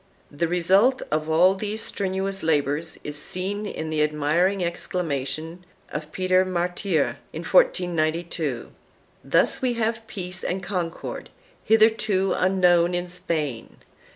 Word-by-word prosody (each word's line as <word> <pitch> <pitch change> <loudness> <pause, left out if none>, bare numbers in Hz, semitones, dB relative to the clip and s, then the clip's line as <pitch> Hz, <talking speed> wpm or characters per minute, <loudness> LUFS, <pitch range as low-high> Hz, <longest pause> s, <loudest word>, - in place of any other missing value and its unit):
The 155 +4 -1
result 190 +9 +3
of 155 +1 -1
all 175 +4 +5
these 210 +2 -4
strenuous 195 -1 -1
labors 155 0 0
is 145 0 -5
seen 200 +3 -3
in 160 -5 -5
the 155 -1 +1
admiring 155 +6 +1
exclamation 165 -1 -3 0.3
of 150 0 -6
Peter 185 +1 +2
Martyr, 180 -2 -1
in - - -6
1492, 165 - +1 0.5
"Thus - - +2
we 255 -2 +1
have 225 0 -2
peace 180 -4 -6
and 190 +1 -2
concord, 180 -3 -4 0.3
hitherto 215 -3 +3
unknown 180 -2 +3
in 175 0 -2
Spain. 155 -8 -3
180 Hz, 120 wpm, -24 LUFS, 160-195 Hz, 0.5 s, all